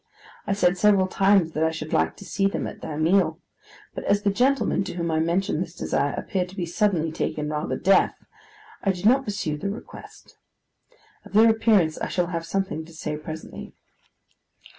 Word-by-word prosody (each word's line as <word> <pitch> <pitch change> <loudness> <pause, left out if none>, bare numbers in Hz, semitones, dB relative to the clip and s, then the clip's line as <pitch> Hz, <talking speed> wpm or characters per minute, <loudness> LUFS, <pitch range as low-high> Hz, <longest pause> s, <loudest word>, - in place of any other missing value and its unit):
I 200 - +1
said 180 -2 +2
several 200 -2 +4
times 195 -3 +3
that 155 0 -1
I 160 - +3
should 160 -1 -6
like 80 0 +1
to - - -11
see 195 0 +1
them 195 - -3
at - - -8
their 150 - -5
meal; 175 +5 +2 0.6
but - - -6
as 205 0 +2
the 200 - +2
gentleman 250 -1 +1
to - - -6
whom 170 -2 -2
I 160 - +1
mentioned 170 +1 0
this 175 -1 -5
desire 140 - -1
appeared 185 -2 -2
to 190 - -13
be 180 -3 -2
suddenly 170 -3 0
taken 150 -1 -3
rather 150 0 -2
deaf, 195 +2 +3 0.7
I 195 - +1
did 180 +1 -7
not 265 +4 +4
pursue 195 -8 -3
the 200 - -2
request. 210 +4 -11 0.8
Of - - -15
their 225 +2 +7
appearance 210 -8 +2
I - - -2
shall 180 -1 -1
have 165 0 -3
something 190 -4 -2
to 170 - -15
say, 155 -1 -4
presently. 155 +1 -8
180 Hz, 190 wpm, -24 LUFS, 160-200 Hz, 0.8 s, their